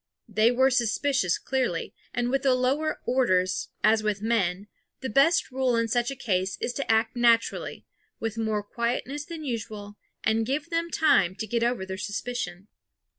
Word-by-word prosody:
They 215 +1 +3
were 260 +2 +3
suspicious 245 -4 +1
clearly; 255 -11 -2 0.2
and 245 0 -1
with 270 - +1
the 265 -2 +3
lower 275 +5 0
orders, 185 -8 +1
as 215 +1 +4
with 210 -2 -1
men, 200 -4 0 0.4
the 260 -4 -3
best 280 +8 +3
rule 255 -1 +1
in 230 0 +1
such 240 +1 +1
a 275 - -4
case 190 -7 -1
is 245 - -2
to 275 -4 -1
act 225 +1 +2
naturally, 235 -1 +1 0.3
with 225 -1 -3
more 220 -2 -1
quietness 245 +6 -3
than 330 -1 -7
usual, 210 -4 -5 0.3
and 220 +1 +2
give 290 +7 -2
them 335 0 0
time 240 - +3
to 210 - -4
get 235 +2 -1
over 240 -5 0
their 190 0 -6
suspicion. 205 -3 -4
235 Hz, 170 wpm, -26 LUFS, 210-260 Hz, 0.4 s, as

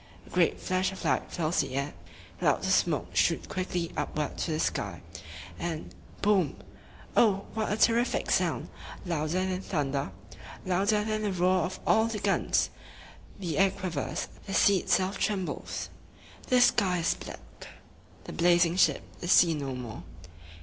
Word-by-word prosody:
A - - -16
great - - +2
flash 185 0 0
of 190 -2 -8
light 130 -4 0
fills 165 0 0
the 135 -3 -1
air; 140 +1 -2 0.5
clouds - - +2
of - - +2
smoke - - +1
shoot - - +2
quickly 180 -2 -3
upward 150 0 -2
to - - -1
the 155 -1 -1
sky; 90 - -2 0.6
and 165 +2 -4 0.3
"Boom!" 200 -6 +3 0.6
Oh, 200 -3 +4
what 220 -2 -1
a 210 - 0
ter 230 - +5
rif 240 +2 +1
ic - - -2
sound! - - +1 0.4
Louder 170 +2 -1
than 185 0 -2
thunder, 140 - -2 0.6
louder 200 +3 +2
than 215 0 -1
the 210 -2 0
roar 185 -1 +2
of 185 - -6
all 220 - +4
the 230 -1 -3
guns! - - +1 0.7
The 170 -6 -3
air 195 0 +6
quivers; 185 -6 -3 0.2
the 195 - -3
sea 200 -1 +5
itself 190 +3 0
trembles; 195 -4 -2 0.6
the 255 - +4
sky 190 -7 +4
is 170 -1 +1
black. - - -11 0.6
The - - -8
blazing 175 0 +3
ship - - +3 0.2
is 175 - -1
seen 165 -3 +5
no 135 -2 -4
more. 120 -3 -7
180 Hz, 160 wpm, -29 LUFS, 155-195 Hz, 0.7 s, air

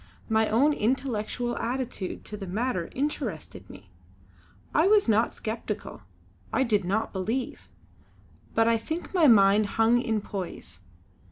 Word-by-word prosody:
My 220 0 +2
own 275 +8 +3
intellectual 240 -1 -1
attitude 245 -5 -4
to 210 - -6
the 195 -2 -7
matter 200 -2 -2
interested 220 - -4
me. 95 0 -14 0.8
I 315 +5 +4
was 415 -5 +4
not 225 +1 +2
sceptical, 225 +1 -5 0.5
I 265 - +2
did 210 -5 +1
not 200 +5 -1
believe; 220 +7 -3 0.9
but 225 0 +4
I 230 -1 +3
think 320 - -5
my 340 -5 +5
mind 205 -2 +5
hung 230 +2 +4
in 220 -3 0
poise. 180 - -7
225 Hz, 135 wpm, -27 LUFS, 200-255 Hz, 0.9 s, my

